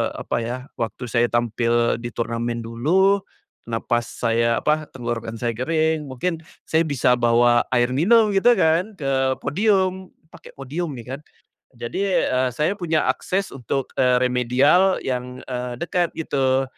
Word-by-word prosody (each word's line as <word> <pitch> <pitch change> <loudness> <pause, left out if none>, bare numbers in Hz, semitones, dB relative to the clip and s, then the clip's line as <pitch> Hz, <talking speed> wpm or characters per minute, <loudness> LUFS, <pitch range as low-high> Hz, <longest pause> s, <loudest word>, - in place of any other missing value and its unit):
apa - - -3
ya, 120 +2 -3 0.2
waktu 115 +2 -4
saya 120 +1 +3
tampil 120 0 +1
di 120 -1 -7
turnamen 115 0 -2
dulu, 170 - +2 0.5
napas 120 +1 -1 0.2
saya 115 0 +1
apa, 155 0 +1
tenggorokan 115 -3 -5
saya 120 - 0
kering, 160 +3 0
mungkin 150 +6 -3 0.3
saya 160 +1 +2
bisa 125 -4 +2
bawa 120 0 +3
air 120 0 +3
minum, 210 - +4
gitu 205 +5 +4
kan, 185 +1 +1
ke 135 -6 0
podium. 190 0 0 0.2
Pake - - -15
podium 150 +4 -5
nih, 125 +1 -7
kan. - - -16 0.6
Jadi, 185 +12 -1
eee, 130 0 +1
saya 150 +7 +1
punya 170 -6 -1
akses 195 +1 -1
untuk, 135 +1 -4
eee, 125 -1 +4
remedial 125 +9 +3
yang, 125 0 -4
eee, 125 -1 -4
dekat, 170 +4 0
gitu. 135 -4 +1
130 Hz, 145 wpm, -22 LUFS, 120-165 Hz, 0.6 s, minum